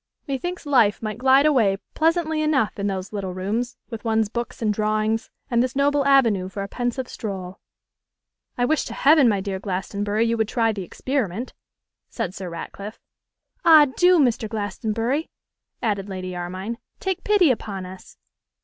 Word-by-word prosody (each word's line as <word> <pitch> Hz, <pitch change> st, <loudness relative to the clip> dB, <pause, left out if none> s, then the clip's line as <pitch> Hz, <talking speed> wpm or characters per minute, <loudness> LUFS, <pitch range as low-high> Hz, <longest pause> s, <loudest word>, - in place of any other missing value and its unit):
'Me 275 Hz, -, -1 dB
thinks 350 Hz, +5 st, -5 dB
life 230 Hz, -8 st, +3 dB
might 215 Hz, 0 st, -4 dB
glide 265 Hz, +2 st, +5 dB
away 230 Hz, -10 st, +3 dB, 0.2 s
pleasantly 320 Hz, -1 st, +1 dB
enough 280 Hz, -10 st, +1 dB
in 200 Hz, -, 0 dB
those 190 Hz, 0 st, -4 dB
little 190 Hz, -3 st, -4 dB
rooms, 220 Hz, +7 st, -2 dB
with 225 Hz, -2 st, -6 dB
one's 220 Hz, -2 st, +1 dB
books 235 Hz, +2 st, -5 dB
and 215 Hz, -2 st, +1 dB
drawings, 215 Hz, +1 st, 0 dB, 0.2 s
and 235 Hz, 0 st, +3 dB
this 255 Hz, +1 st, -1 dB
noble 285 Hz, +1 st, +2 dB
avenue 230 Hz, -9 st, +4 dB
for 200 Hz, +1 st, -5 dB
a -, -, -5 dB
pensive 245 Hz, +3 st, -3 dB
stroll.' 190 Hz, -4 st, -6 dB, 1.0 s
'I 245 Hz, -, +2 dB
wish 310 Hz, +3 st, +1 dB
to -, -, -6 dB
heaven, 285 Hz, -3 st, +5 dB
my 205 Hz, -2 st, +1 dB
dear 190 Hz, -1 st, -3 dB
Glastonbury, 205 Hz, +3 st, -1 dB
you 230 Hz, 0 st, +1 dB
would 220 Hz, -1 st, +1 dB
try 230 Hz, -1 st, +1 dB
the 205 Hz, -2 st, -5 dB
experiment,' 240 Hz, +2 st, -3 dB, 0.6 s
said 180 Hz, -, -3 dB
Sir 190 Hz, -2 st, -6 dB
Ratcliffe. 200 Hz, +5 st, -8 dB, 0.6 s
'Ah! 315 Hz, -3 st, +8 dB
do, 360 Hz, 0 st, +5 dB
Mr. 235 Hz, -7 st, +2 dB
Glastonbury,' 225 Hz, -, -2 dB, 0.5 s
added 205 Hz, -3 st, -1 dB
Lady 185 Hz, -1 st, -5 dB
Armine, 185 Hz, +6 st, -5 dB, 0.2 s
'take 380 Hz, -2 st, -2 dB
pity 400 Hz, -8 st, +4 dB
upon 200 Hz, -5 st, -4 dB
us! 185 Hz, +1 st, -12 dB
225 Hz, 165 wpm, -23 LUFS, 200-265 Hz, 1.0 s, Ah